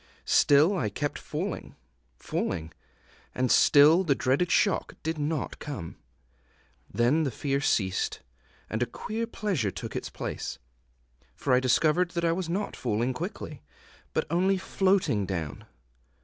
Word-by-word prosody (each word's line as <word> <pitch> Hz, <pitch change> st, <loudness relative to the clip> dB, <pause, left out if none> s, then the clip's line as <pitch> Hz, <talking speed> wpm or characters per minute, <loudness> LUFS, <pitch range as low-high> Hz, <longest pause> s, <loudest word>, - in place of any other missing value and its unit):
Still 150 Hz, +7 st, +5 dB
I 110 Hz, -, 0 dB
kept 145 Hz, +8 st, -3 dB
falling, -, -, -5 dB, 0.4 s
falling, 80 Hz, -3 st, -3 dB, 0.6 s
and 125 Hz, -1 st, +1 dB
still 155 Hz, +6 st, +6 dB
the 145 Hz, -6 st, +2 dB
dreaded 135 Hz, +7 st, +1 dB
shock 195 Hz, +2 st, +1 dB
did 160 Hz, -1 st, -2 dB
not 150 Hz, -1 st, -2 dB
come. 130 Hz, -, -6 dB, 1.0 s
Then 125 Hz, +7 st, +2 dB
the 150 Hz, -, +1 dB
fear 140 Hz, +3 st, -1 dB
ceased, 95 Hz, -9 st, 0 dB, 0.5 s
and 110 Hz, -, -3 dB
a 125 Hz, -, +2 dB
queer 225 Hz, -, -4 dB
pleasure 195 Hz, -, -1 dB
took -, -, -7 dB
its -, -, -3 dB
place; -, -, -5 dB, 0.8 s
for 135 Hz, -, 0 dB
I 125 Hz, -, +6 dB
discovered 155 Hz, +7 st, +2 dB
that 170 Hz, -, +1 dB
I 165 Hz, -, +3 dB
was 170 Hz, 0 st, -2 dB
not 195 Hz, +5 st, -2 dB
falling 120 Hz, +2 st, -1 dB
quickly, 160 Hz, -, -6 dB, 0.5 s
but -, -, 0 dB
only 190 Hz, +3 st, +2 dB
floating 185 Hz, -, +1 dB
down. 80 Hz, -7 st, -4 dB
145 Hz, 135 wpm, -28 LUFS, 120-175 Hz, 1.0 s, still